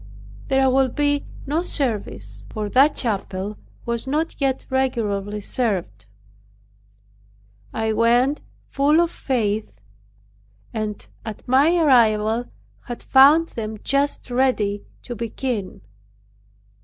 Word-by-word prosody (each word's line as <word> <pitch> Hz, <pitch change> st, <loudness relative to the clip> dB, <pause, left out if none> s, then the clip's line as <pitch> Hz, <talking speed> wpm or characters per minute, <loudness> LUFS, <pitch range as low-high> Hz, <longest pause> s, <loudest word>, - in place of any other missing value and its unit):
There 270 Hz, 0 st, +3 dB
will 265 Hz, +1 st, +3 dB
be 290 Hz, +2 st, 0 dB, 0.2 s
no 300 Hz, +4 st, 0 dB
service." 200 Hz, -, -1 dB
For 210 Hz, -, -4 dB
that 275 Hz, +7 st, +4 dB
chapel 200 Hz, -3 st, -2 dB, 0.3 s
was 235 Hz, +1 st, -2 dB
not 310 Hz, +3 st, -2 dB
yet 265 Hz, -1 st, 0 dB
regularly 210 Hz, -6 st, -1 dB
served. 195 Hz, -, -1 dB, 1.6 s
I 220 Hz, 0 st, -1 dB
went 240 Hz, +6 st, +2 dB, 0.3 s
full 290 Hz, +3 st, +2 dB
of 340 Hz, 0 st, +2 dB
faith 215 Hz, -, -2 dB, 0.9 s
and 215 Hz, -2 st, -4 dB, 0.2 s
at 220 Hz, -2 st, -8 dB
my 280 Hz, +7 st, +4 dB
arrival 230 Hz, -6 st, +3 dB, 0.4 s
have 240 Hz, -, -7 dB
found 290 Hz, +5 st, +6 dB
them 220 Hz, -1 st, -5 dB
just 275 Hz, -2 st, 0 dB
ready 235 Hz, -6 st, 0 dB, 0.2 s
to 240 Hz, -, -6 dB
begin. 230 Hz, -3 st, -4 dB
240 Hz, 105 wpm, -22 LUFS, 210-270 Hz, 1.6 s, found